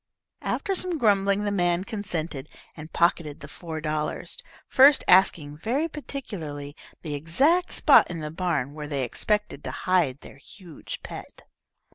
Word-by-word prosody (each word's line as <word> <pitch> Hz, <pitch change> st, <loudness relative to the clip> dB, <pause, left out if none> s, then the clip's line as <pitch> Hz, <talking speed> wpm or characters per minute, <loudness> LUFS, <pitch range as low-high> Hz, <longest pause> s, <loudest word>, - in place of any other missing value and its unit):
After 390 Hz, -, -2 dB
some 365 Hz, -2 st, -1 dB
grumbling 200 Hz, -4 st, +2 dB
the 205 Hz, -, -1 dB
man 175 Hz, -2 st, +1 dB
consented, 170 Hz, -, -4 dB, 0.3 s
and 155 Hz, 0 st, -10 dB
pocketed 170 Hz, -3 st, +1 dB
the 140 Hz, -, -8 dB
four 160 Hz, +1 st, -7 dB
dollars, 155 Hz, -1 st, -3 dB, 0.3 s
first 275 Hz, +2 st, +6 dB
asking 155 Hz, -5 st, +4 dB
very 265 Hz, -, 0 dB
particularly 165 Hz, -, -7 dB, 0.3 s
the 155 Hz, -3 st, -4 dB
exact 270 Hz, -, +2 dB
spot -, -, +5 dB
in 170 Hz, -2 st, -5 dB
the 150 Hz, -1 st, -5 dB
barn 160 Hz, -6 st, -1 dB
where 150 Hz, -1 st, -7 dB
they 140 Hz, -3 st, -2 dB
expected 210 Hz, -, -2 dB
to -, -, -4 dB, 0.2 s
hide 170 Hz, -8 st, +2 dB
their -, -, -13 dB
huge 170 Hz, +2 st, -10 dB
pet. -, -, -10 dB
170 Hz, 145 wpm, -25 LUFS, 150-210 Hz, 0.3 s, first